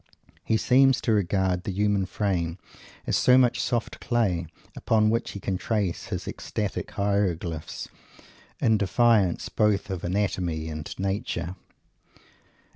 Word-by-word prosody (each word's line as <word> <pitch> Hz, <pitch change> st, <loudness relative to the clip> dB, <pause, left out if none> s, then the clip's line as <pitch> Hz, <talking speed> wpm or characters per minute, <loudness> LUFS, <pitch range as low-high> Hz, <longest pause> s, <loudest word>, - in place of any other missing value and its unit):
He 110 Hz, -, +1 dB
seems 130 Hz, +2 st, +4 dB
to 115 Hz, -, 0 dB
regard 95 Hz, -2 st, +1 dB
the 100 Hz, -, -3 dB
human 100 Hz, 0 st, +1 dB
frame 90 Hz, -5 st, -1 dB, 0.5 s
as -, -, 0 dB
so 125 Hz, 0 st, +5 dB
much 125 Hz, -2 st, +3 dB
soft 120 Hz, -2 st, -2 dB
clay, 100 Hz, -9 st, 0 dB, 0.3 s
upon 110 Hz, -1 st, +2 dB
which 115 Hz, +1 st, 0 dB
he 100 Hz, -, -6 dB
can 95 Hz, -2 st, -2 dB
trace 100 Hz, -6 st, -1 dB
his -, -, -4 dB
ecstatic -, -, -4 dB
hieroglyphs, 90 Hz, -6 st, -2 dB, 0.7 s
in 110 Hz, -2 st, +3 dB
defiance 100 Hz, -1 st, +2 dB
both 105 Hz, -2 st, +1 dB
of 95 Hz, -3 st, -4 dB
anatomy 90 Hz, -4 st, -1 dB
and 75 Hz, -1 st, -6 dB
nature. 95 Hz, -3 st, -2 dB
100 Hz, 125 wpm, -26 LUFS, 90-110 Hz, 0.7 s, so